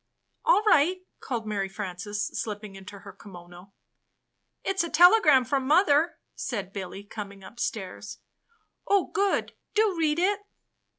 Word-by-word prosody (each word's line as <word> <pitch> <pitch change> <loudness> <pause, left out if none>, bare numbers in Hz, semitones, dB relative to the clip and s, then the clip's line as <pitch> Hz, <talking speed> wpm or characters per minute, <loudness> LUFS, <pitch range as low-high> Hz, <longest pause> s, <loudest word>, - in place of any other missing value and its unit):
" - - -38
''All 445 -3 +4
right!" 365 0 +3
called 235 -4 -4
Mary 200 -2 -2
Frances, 205 +1 -4
slipping 210 -2 -5
into 195 +1 -11
her 200 - -11
kimono. 175 0 -13 0.9
"It's 385 -2 0
a 335 - -4
telegram 335 - +6
from 270 0 -1
mother," 315 0 +3 0.2
said 200 -6 -5
Billy, 195 0 -6
coming 200 -1 -9
upstairs. 210 -3 -5 0.7
"Oh, 400 -2 +2
good! 400 -1 0 0.2
Do 430 -3 +3
read 315 -2 +1
it!" 395 +4 +2
235 Hz, 130 wpm, -27 LUFS, -, 0.9 s, telegram